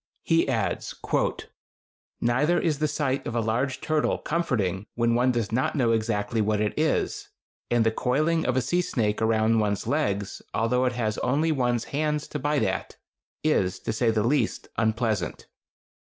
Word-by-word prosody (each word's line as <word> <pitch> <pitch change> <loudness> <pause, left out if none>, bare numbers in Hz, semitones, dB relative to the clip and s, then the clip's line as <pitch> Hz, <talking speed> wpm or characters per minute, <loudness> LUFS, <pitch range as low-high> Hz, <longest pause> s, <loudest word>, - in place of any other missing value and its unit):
He - - +2
adds: - - -1 1.3
Neither 135 +9 +2
is 155 -5 0
the 155 - +2
sight 140 -3 -1
of 120 - -4
a - - +2
large 120 +4 -1
turtle 155 -1 +1
comforting 105 - -1
when 115 0 +2
one 125 +2 +3
does 115 -4 -2
not 125 +7 0
know 125 -5 +2
exactly 110 -1 0
what 105 0 +1
it 105 0 0
is, 155 +1 0 0.4
and 120 -1 +3
the 110 - +3
coiling 155 +8 +1
of 130 0 +1
a - - +3
sea 175 +8 +1
snake 110 -11 -1
around 110 0 +3
one's 105 -2 0
legs, 100 -10 -1
although 125 +3 +2
it 125 - +1
has 110 -3 -1
only 155 +5 +1
one's 120 -5 +1
hands 150 0 0
to 150 - -4
bite 145 +1 +1
at, 95 0 -2 0.5
is, 95 -12 +1
to - - -2
say 115 +1 +1
the 110 -2 +1
least, 125 -1 0
unpleasant. 110 -5 -1
120 Hz, 170 wpm, -26 LUFS, 110-145 Hz, 1.3 s, one